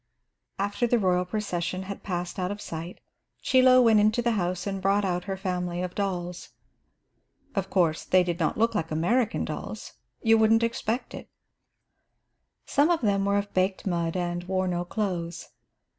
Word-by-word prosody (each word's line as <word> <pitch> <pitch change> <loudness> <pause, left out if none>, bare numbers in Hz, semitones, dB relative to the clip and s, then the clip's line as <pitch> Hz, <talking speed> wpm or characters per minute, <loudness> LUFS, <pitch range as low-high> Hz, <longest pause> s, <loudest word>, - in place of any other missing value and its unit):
After 205 +4 0
the 240 - +3
royal 180 -3 +2
procession 185 -2 -3
had 200 +1 -7
passed 175 -1 -4
out 180 0 -1
of 205 +1 -5
sight, 165 -1 -7 0.4
Chie 260 - +4
Lo 255 0 +7
went 225 -2 +5
into 215 +3 +2
the 235 - +2
house 180 -4 -1
and 195 -1 -3
brought 200 +1 +2
out 180 -1 -1
her 195 -1 -3
family 180 -2 -2
of 180 -1 -4
dolls. 180 -3 -3 1.0
Of 195 -2 -2
course 170 -4 +1
they 185 0 +4
did 175 -1 -3
not 160 - 0
look 230 +1 +2
like 165 -6 -2
American 205 +10 +1
dolls; - - -6 0.3
you 225 -1 +5
wouldn't 225 +1 +4
expect 230 +1 -2
it. - - -9 1.4
Some 290 +3 +3
of 345 -2 +2
them 200 -3 +1
were 200 0 +2
of 200 0 -3
baked 185 +1 0
mud 170 -2 -1
and 175 0 -2
wore 185 0 0
no 175 -1 -1
clothes. 175 -4 -3
190 Hz, 175 wpm, -27 LUFS, 175-215 Hz, 1.4 s, Lo